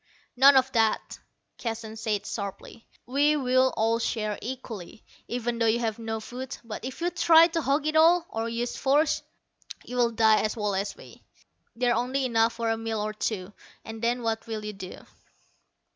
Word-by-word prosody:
"None 270 Hz, +2 st, +7 dB
of 265 Hz, 0 st, +3 dB
that," 225 Hz, -3 st, 0 dB, 0.4 s
Keston 225 Hz, -2 st, -5 dB
said 215 Hz, -2 st, -2 dB
sharply. 200 Hz, +2 st, -7 dB, 0.2 s
"We'll 260 Hz, -1 st, +2 dB
all 225 Hz, +1 st, +2 dB
share 215 Hz, -3 st, -2 dB
equally, 230 Hz, -7 st, -7 dB, 0.2 s
even 240 Hz, -1 st, -2 dB
though 230 Hz, -, +3 dB
you 220 Hz, +1 st, +3 dB
have 230 Hz, -1 st, -2 dB
no 225 Hz, -1 st, -3 dB
food. 250 Hz, +4 st, -7 dB
But 220 Hz, -2 st, -7 dB
if 260 Hz, +5 st, -7 dB
you 350 Hz, +1 st, 0 dB
try 335 Hz, -2 st, +6 dB
to 330 Hz, 0 st, -1 dB
hog 285 Hz, +1 st, +1 dB
it 310 Hz, 0 st, -1 dB
all, 335 Hz, +2 st, +5 dB
or 225 Hz, +1 st, -2 dB
use 235 Hz, +1 st, -3 dB
force, 290 Hz, +3 st, +2 dB, 0.6 s
you'll 245 Hz, -1 st, +1 dB
die 220 Hz, -1 st, +4 dB
as 215 Hz, +1 st, -2 dB
well 210 Hz, -2 st, -1 dB
as 195 Hz, +1 st, -2 dB
we. -, -, -14 dB, 0.5 s
There's 245 Hz, 0 st, +2 dB
only 260 Hz, +2 st, 0 dB
enough 230 Hz, -2 st, +2 dB
for 230 Hz, -1 st, -1 dB
a 225 Hz, -, 0 dB
meal 225 Hz, -1 st, -3 dB
or 215 Hz, +1 st, -2 dB
two; 205 Hz, -2 st, -3 dB, 0.3 s
and 220 Hz, 0 st, -8 dB
then 240 Hz, +1 st, 0 dB
what 225 Hz, 0 st, -2 dB
will 215 Hz, -2 st, -5 dB
you 210 Hz, -, -4 dB
do?" 185 Hz, -2 st, -10 dB
230 Hz, 175 wpm, -27 LUFS, 220-260 Hz, 0.6 s, None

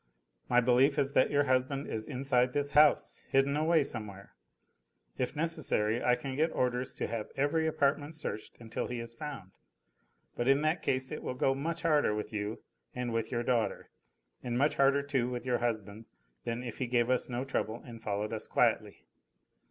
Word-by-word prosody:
"My 125 Hz, -, +5 dB
belief 130 Hz, +4 st, +4 dB
is 140 Hz, -1 st, +1 dB
that 130 Hz, -, +4 dB
your 145 Hz, 0 st, +3 dB
husband 130 Hz, +1 st, 0 dB
is 110 Hz, -1 st, -4 dB
inside 125 Hz, -2 st, +1 dB
this 145 Hz, 0 st, -1 dB
house, 150 Hz, 0 st, +4 dB
hidden 135 Hz, +1 st, +3 dB
away 160 Hz, +1 st, +3 dB
somewhere. 105 Hz, -6 st, -6 dB, 0.9 s
If 130 Hz, +3 st, -1 dB
necessary 150 Hz, -9 st, 0 dB
I 125 Hz, -, +4 dB
can 135 Hz, +1 st, -5 dB
get 160 Hz, +3 st, +2 dB
orders 125 Hz, 0 st, -1 dB
to -, -, -2 dB
have 115 Hz, -2 st, -4 dB
every 160 Hz, +3 st, +1 dB
apartment 145 Hz, 0 st, 0 dB
searched 110 Hz, -8 st, -5 dB
until 115 Hz, -1 st, -4 dB
he 120 Hz, -1 st, -4 dB
is 115 Hz, 0 st, -7 dB
found: 115 Hz, -8 st, -7 dB, 0.8 s
but 120 Hz, -, -1 dB
in 135 Hz, +2 st, +4 dB
that 155 Hz, +2 st, +1 dB
case 130 Hz, -2 st, 0 dB
it -, -, -5 dB
will 125 Hz, -, -4 dB
go 135 Hz, +1 st, +2 dB
much 160 Hz, +5 st, -3 dB
harder 150 Hz, -9 st, +3 dB
with 105 Hz, +1 st, -5 dB
you 105 Hz, +1 st, -4 dB, 0.3 s
and 125 Hz, -2 st, -2 dB
with 115 Hz, -1 st, -1 dB
your 120 Hz, -1 st, -1 dB
daughter, 120 Hz, -2 st, -1 dB, 0.5 s
and 120 Hz, -1 st, -2 dB
much 145 Hz, +4 st, +2 dB
harder 140 Hz, +1 st, +4 dB
too 135 Hz, -4 st, 0 dB
with 125 Hz, 0 st, -5 dB
your 125 Hz, -2 st, +1 dB
husband 110 Hz, -2 st, -3 dB, 0.4 s
than 115 Hz, +1 st, -3 dB
if 120 Hz, -3 st, -7 dB
he 130 Hz, -, -1 dB
gave 120 Hz, 0 st, +2 dB
us 130 Hz, -, +1 dB
no 125 Hz, +2 st, -2 dB
trouble 115 Hz, -4 st, -2 dB
and 115 Hz, -2 st, -10 dB
followed 105 Hz, 0 st, -2 dB
us -, -, -4 dB
quietly." -, -, +1 dB
125 Hz, 185 wpm, -31 LUFS, 115-140 Hz, 0.9 s, My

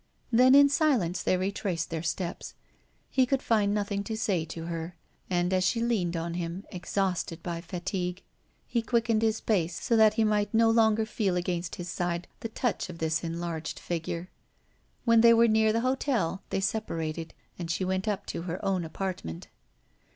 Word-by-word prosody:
Then 255 Hz, +3 st, +6 dB
in 285 Hz, 0 st, +8 dB
silence 260 Hz, -, +1 dB
they 185 Hz, -, +2 dB
retraced 185 Hz, -3 st, -2 dB
their 165 Hz, -1 st, -2 dB
steps. 170 Hz, +2 st, -4 dB, 0.6 s
He 260 Hz, -1 st, +3 dB
could 270 Hz, 0 st, 0 dB
find 210 Hz, -3 st, +2 dB
nothing 205 Hz, -1 st, -1 dB
to 220 Hz, -1 st, -3 dB
say 195 Hz, -7 st, 0 dB
to 165 Hz, 0 st, -7 dB
her; 170 Hz, +1 st, -5 dB, 0.3 s
and, 180 Hz, 0 st, +1 dB
as 185 Hz, 0 st, +2 dB
she 205 Hz, +6 st, +1 dB
leaned 205 Hz, -8 st, 0 dB
on 165 Hz, +1 st, -3 dB
him, 175 Hz, +3 st, -4 dB
exhausted 180 Hz, -3 st, -2 dB
by 170 Hz, -1 st, -3 dB
fatigue, 180 Hz, +1 st, -4 dB, 0.4 s
he 235 Hz, -, 0 dB
quickened 230 Hz, -1 st, +1 dB
his 220 Hz, -1 st, +1 dB
pace 175 Hz, -6 st, 0 dB
so 235 Hz, -, +1 dB
that 220 Hz, -1 st, +5 dB
he 225 Hz, -, +3 dB
might 210 Hz, 0 st, +1 dB
no 225 Hz, 0 st, +5 dB
longer 220 Hz, -1 st, +3 dB
feel 210 Hz, -4 st, -1 dB
against 175 Hz, -1 st, -2 dB
his 175 Hz, -, -6 dB
side 175 Hz, 0 st, -2 dB
the 225 Hz, -, -5 dB
touch 225 Hz, -3 st, -2 dB
of 170 Hz, -, -7 dB
this 160 Hz, 0 st, -1 dB
enlarged 165 Hz, -1 st, -4 dB
figure. 170 Hz, +1 st, -4 dB, 0.7 s
When 230 Hz, -1 st, +6 dB
they 230 Hz, 0 st, +7 dB
were 230 Hz, +1 st, +6 dB
near 220 Hz, 0 st, +4 dB
the 230 Hz, +1 st, +1 dB
hotel, 245 Hz, -, 0 dB
they 195 Hz, -, -1 dB
separated, 165 Hz, -6 st, -3 dB, 0.2 s
and 170 Hz, -2 st, -4 dB
she 180 Hz, +3 st, 0 dB
went 190 Hz, +2 st, -1 dB
up 205 Hz, -2 st, -1 dB
to -, -, -4 dB
her 175 Hz, +1 st, -4 dB
own 190 Hz, -2 st, +1 dB
apartment. 160 Hz, -, -5 dB
190 Hz, 180 wpm, -28 LUFS, 170-220 Hz, 0.7 s, in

